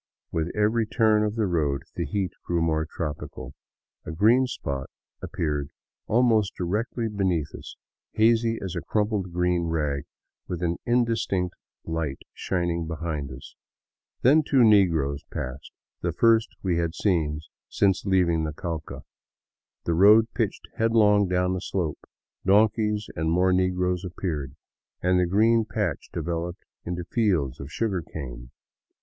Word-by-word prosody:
With 80 +1 -1
every 110 +2 +2
turn 110 -2 +3
of 105 0 -1
the 110 -2 +1
road 75 -7 0
the 85 -3 -2
heat 95 +3 -1
grew 85 -1 0
more 80 -1 0
tropical. 75 -3 -6 0.5
A - - -6
green 115 +10 +4
spot 70 - -4 0.3
appeared 75 -3 -2 0.4
almost 110 -3 +3
directly 110 +6 -2
beneath 95 -8 -1
us, - - -9 0.4
hazy 115 +1 +3
as 95 -2 -4
a 85 - -2
crumpled 105 -4 -1
green 90 0 +1
rag 75 -3 -1 0.4
with 90 -1 -4
an 85 0 0
indistinct 115 -7 +1 0.3
light 80 -4 -3 0.2
shining 85 -3 -2
behind 80 -3 -4
it. 70 +2 -10 0.8
Then 145 +6 +6
two 135 -4 +3
negroes 85 -10 +3
passed, 65 +2 -6 0.3
the - - 0
first 115 -1 +3
we 90 -3 +1
had 85 0 -1
seen 80 -7 0 0.3
since 95 -3 +2
leaving 90 -4 +2
the 75 -1 -3
Cauca. 80 -1 -5 0.8
The 85 - +1
road 105 +6 +6
pitched 110 -3 -2
headlong 105 -3 +4
down 90 +1 +1
a 90 - -4
slope, 85 -6 -2 0.4
donkeys 105 +1 +3
and 80 0 -1
more 90 +3 +3
negroes 90 -1 +1
appeared, 80 -7 -4 0.5
and 90 0 +3
the 90 - +2
green 110 +5 +4
patch 110 - -3
developed 85 +1 -4 0.2
into 90 0 -3
fields 85 - 0
of 70 +2 -8
sugarcane. 80 - -4
90 Hz, 135 wpm, -26 LUFS, 80-105 Hz, 0.8 s, Then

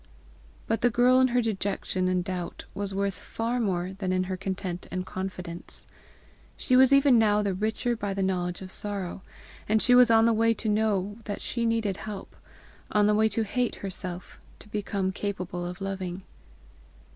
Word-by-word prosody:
But 225 0 -1
the 245 - +4
girl 245 +2 +4
in 260 - +5
her 245 -1 +1
dejection 195 -3 -1
and 185 -1 +1
doubt, 180 -2 -5
was 200 -1 -3
worth 200 0 0
far 230 +6 -3
more 185 -4 -1
than 190 -1 -3
in 185 0 +1
her 185 0 -3
content 185 -1 -4
and 185 0 -3
confidence. 180 -3 -6 0.7
She 255 - +2
was 260 +1 +7
even 275 -3 +6
now 210 -1 +3
the 200 -2 0
richer 220 +5 -1
by 205 -3 -3
the 195 - 0
knowledge 180 -1 -1
of 185 - -9
sorrow, 200 -3 -3 0.5
and 220 +1 +4
she 245 - +5
was 245 -1 +7
on 225 0 +6
the 230 - +4
way 230 +1 +3
to 220 - -3
know 210 -1 0
that 205 - -4
she 235 -2 -1
needed 220 -4 0
help, 205 -3 -7 0.6
on 210 -1 +4
the 210 - +4
way 220 +1 +3
to 225 - 0
hate 245 +3 -1
herself, 185 -2 -6 0.2
to - - -15
become 200 -2 -2
capable 180 -3 -4
of 180 +2 -7
loving. 190 -1 -4
200 Hz, 180 wpm, -27 LUFS, 185-225 Hz, 0.7 s, was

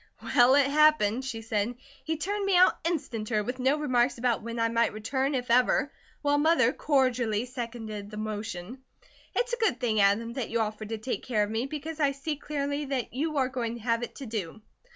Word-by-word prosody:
"Well, 245 +2 +5
it 285 -1 +5
happened," 280 -5 +3
she 225 -4 -5
said. 220 +2 -1 0.3
"He 320 0 -2
turned 400 +6 -2
me 395 -2 +3
out 365 +1 +5
instanter, 230 -10 -1
with 250 +3 -4
no 265 +4 +2
remarks 255 -4 +1
about 240 -1 0
when 230 +1 -6
I 230 - +3
might 230 -1 +1
return, 265 +6 -1
if 245 -2 -2
ever, 250 +3 +3 0.3
while 290 0 +3
Mother 295 -5 +4
cordially 250 -7 +1
seconded 230 -4 -6
the 210 - -8
motion. 215 +1 -5 0.6
It's 485 0 0
a - - +1
good 440 - +1
thing, 225 -4 +1
Adam, 215 +4 +2
that 250 -2 -3
you 230 - 0
offered 215 -1 -3
to 225 - -3
take 230 +4 -3
care 220 -4 0
of 205 - -3
me, 225 +4 -1
because 305 +2 -6
I 280 -2 +2
see 280 +3 -3
clearly 285 0 -3
that 265 -5 -3
you 300 +4 -2
are 265 -2 +3
going 235 -3 -3
to 235 - -9
have 230 -1 +1
it 240 - -6
to 275 - -7
do." 215 -3 -5
245 Hz, 210 wpm, -28 LUFS, 225-285 Hz, 0.6 s, Well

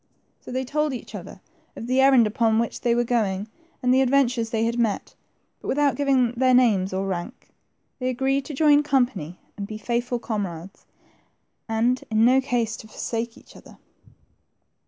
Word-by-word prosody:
So - - -11
they 260 +1 -2
told 300 +2 -1
each 235 - -9
other 190 -1 -9 0.3
of - - -7
the 255 +2 +2
errand 265 -3 +6
upon 220 0 +1
which 230 0 -2
they 235 -1 +2
were 240 - +2
going, 210 -4 -1 0.4
and 250 0 +3
the 260 - +4
adventures 250 -3 +2
they 225 0 0
had 235 +1 -1
met, 225 -4 -1 0.5
but - - -9
without 285 0 +2
giving 270 -4 +2
their 255 +1 +3
names 210 -7 +3
or 190 +1 -2
rank. 190 +6 -5 0.5
They 255 -1 -1
agreed 270 +2 0
to 295 - -6
join 295 0 +5
company 240 - 0 0.2
and 200 -1 -5
be 215 - -6
faithful 240 +3 -2
comrades, 195 -6 -5 0.8
and 235 +3 +1
in 220 0 +3
no 260 +2 +5
case 235 -4 -1
to 220 - -11
forsake 230 +1 -4
each - - -18
other. - - -15
240 Hz, 175 wpm, -24 LUFS, 220-260 Hz, 0.8 s, errand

